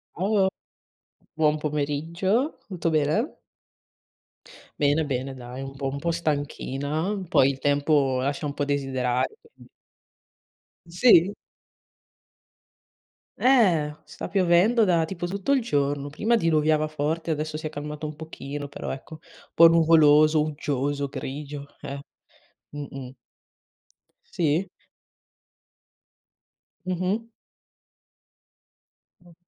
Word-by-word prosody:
Ciao. 195 +2 +2 0.9
Buon 155 -1 +2
pomeriggio. 160 - -1
Tutto 175 -4 -2
bene? 155 - 0 1.4
Bene, 145 +2 +3
bene. 135 -1 -3
Dai 125 +1 -8
un 135 0 -7
po' 135 0 -3
un 140 +1 -5
po' 170 +4 -2
stanchina. 155 +3 -2
Poi 135 -7 +5
il 135 - -8
tempo 145 -2 +2
lascia 140 +3 -2
un 140 - -5
po' 145 - -1
desiderare, 135 - -1
quindi 460 0 -20 1.2
Sì. 180 0 +5 2.0
Eh, 180 - +3
sta - - -8
piovendo 195 +5 +4
da 170 -4 +2
tipo 175 +1 -5
tutto 200 +9 -1
il 270 - +3
giorno. 145 -8 -1
Prima 215 +11 +1
diluviava 155 -5 +2
forte, 155 +2 -2
adesso 155 0 -3
si 155 - -8
è - - -1
calmato 150 +1 -6
un 150 0 -5
pochino. 145 -2 -7
Però 145 - -6
ecco, 135 +4 -8
un - - -21
po' 165 - +9
nuvoloso, 155 -2 +5
uggioso, 145 -2 -2
grigio, 140 +1 -6 0.2
eh. 140 +1 -6 0.7
Mh-mh. 135 -3 -8 1.2
Sì. 165 +3 +1 2.2
Mh-mh. 185 +4 -1 2.0
Mh. 175 -1 -18
155 Hz, 105 wpm, -25 LUFS, 145-175 Hz, 2.2 s, po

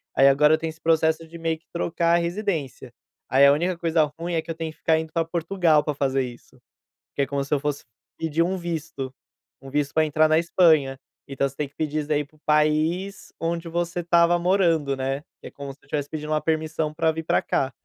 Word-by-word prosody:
aí 135 - +6
agora 150 +3 +5
eu - - +4
tenho 165 0 -3
esse 160 0 -12
processo 160 0 +2
de 170 - -10
meio 165 -1 -1
que 160 - -36
trocar 170 0 0
a - - +4
residência. 170 - -3 0.4
Aí 135 +3 +6
a 140 - +7
única 175 +3 0
coisa 165 -2 +2 0.2
ruim, 170 +1 -3
é 165 - +1
que 165 - -19
eu - - -5
tenho 160 -1 -4
que - - -21
ficar 160 -1 +2
indo 160 0 -6
pra 165 0 0
Portugal 165 -2 +2
pra 150 - -1
fazer 135 -1 0
isso. 120 -1 -11 0.5
Que 140 - 0
é 135 - +1
como 140 0 -2
se 140 - -3
eu 145 - +2
fosse 145 0 -3 0.3
pedir 160 0 -1
um 185 +2 -1
visto, 160 -6 -5 0.5
um 135 - -10
visto 145 +1 -1
pra 160 - +3
entrar 155 +1 +3
na 155 - +3
Espanha, 155 -6 +3 0.3
então 140 0 -1
você 135 - -18
tem 145 0 -2
que 145 - -38
pedir 155 0 -2
isso 145 - -4
daí 150 -1 +1
pro 155 +2 -27
país 155 +6 +1
onde 170 0 -2
você 175 +1 -2
estava 170 0 +4
morando, 170 -6 +2
né, 135 +1 -2 0.2
que - - -10
é - - -11
como 140 -1 -7
se 140 - -25
eu - - -24
tivesse 145 -1 -2
pedindo 155 0 -5
uma 155 - +1
permissão 155 -1 -1
pra 160 +1 +1
vir 160 +1 -5
pra - - +2
cá. 135 0 -1
155 Hz, 240 wpm, -24 LUFS, 145-170 Hz, 0.5 s, a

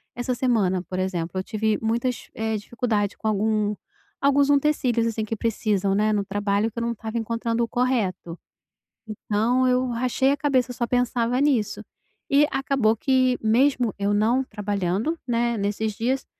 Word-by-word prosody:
essa 245 +1 -2
semana, 210 -8 +1
por 185 0 -5
exemplo, 185 -1 -2
eu - - -2
tive 215 +1 -1
muitas, 235 +2 -2
eh, 220 -1 -1
dificuldade 210 -2 -2
com 220 - -4
algum 210 0 0 0.5
alguns 280 0 +3
utensílios 270 -5 +2
assim 225 -1 -2
que 225 +1 -3
precisam, 205 -3 0
né, 215 +1 +2
no 205 -1 0
trabalho 205 +2 0
que - - -26
eu - - -3
não 235 0 -1
tava 220 +1 -5
encontrando 230 +1 -1
o 230 - -1
correto, 220 -10 -1 0.7
então 220 +4 0
eu 255 0 +2
rachei 255 +3 +1
a 285 - 0
cabeça, 260 -4 +1
só 240 0 -1
pensava 245 0 0
nisso, 250 -8 +1 0.5
e 280 +2 +5
acabou 270 -5 +1
que 255 +1 +2
mesmo 245 +1 +2
eu 200 +1 0
não 225 +6 +2
trabalhando, 205 - -2
né, 235 -1 0
nesses 205 +2 -1
dias 255 +5 -1
230 Hz, 160 wpm, -24 LUFS, 210-250 Hz, 0.7 s, e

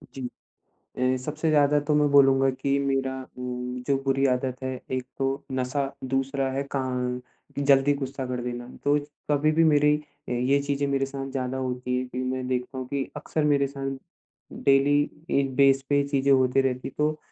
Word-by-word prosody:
जी। 135 - -6 0.8
अ, 130 0 +2
सबसे 155 +3 -2
ज़्यादा 150 -1 +4
तो 150 - +3
मैं 150 -1 +3
बोलूँगा 135 -1 +5
की 140 +1 0
मेरा 135 -1 0 0.2
उम, 125 0 -4
जो 140 - +3
बुरी 135 0 +2
आदत 130 0 0
है 130 -1 -3
एक 130 -1 -1
तो 135 +1 -1
नशा, 130 +2 -1
दूसरा 135 +1 -1
है 135 +1 -1
का 135 - +1 0.8
जल्दी 140 0 +4
गुस्सा 135 -1 -4
कर 125 0 -3
देना। 120 0 -5 0.2
तो 145 +1 +4 0.3
कभी 145 +1 +3
भी 165 +1 +4
मेरी 150 -1 +4 0.3
अ, - - -2
ये 125 +3 +2
चीज़ें 140 0 -1
मेरे 135 -1 +1
साथ 135 0 -5
ज़्यादा 130 -1 -2
होती 125 -1 -2
है 130 - -2
कि 125 0 -7
मैं 130 0 -2
देखता 130 +1 -2
हूँ 130 - -4
कि 140 0 -1
अक्सर 155 - -2
मेरे 140 -2 +3
साथ 135 0 -4 0.7
डेली 140 +1 +4 0.4
इस 135 -1 -1
बेस 135 -1 +5
पे 145 - +3
ये 140 - +4
चीज़ें 140 -1 +1
होती 130 0 +4
रहती 130 -1 -1
है - - -11
तो 150 +1 +1
135 Hz, 185 wpm, -26 LUFS, 130-140 Hz, 0.8 s, बोलूँगा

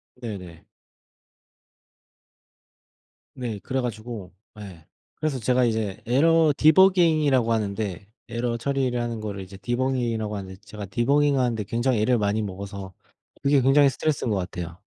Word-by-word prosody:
네네. 95 -9 -8 2.7
네. 120 -6 -4
그래 130 0 -1
가지고 110 -5 -6 0.3
예. 90 -6 -11 0.3
그래서 150 -4 -2
제가 125 +2 +2
이제 110 -4 -2
에러 160 +6 +4
디버깅이라고 155 -7 +4
하는데 100 -3 -3 0.2
에러 120 +1 -2
처리를 130 -1 -1
하는 120 -1 -3
거를 100 -2 -5
이제 95 +1 -10
디버깅이라고 120 -2 -1
하는데 95 -1 -7
제가 105 0 -8
디버깅하는데 125 +1 +1
굉장히 120 +2 0
애를 125 +3 +3
많이 105 0 0
먹어서 100 -1 -6 0.5
그게 140 -1 +3
굉장히 135 +2 +5
스트레스인 140 -2 -1
것 100 - +1
같아요. 90 -2 -5
115 Hz, 315 characters per minute, -24 LUFS, 100-130 Hz, 2.7 s, 굉장히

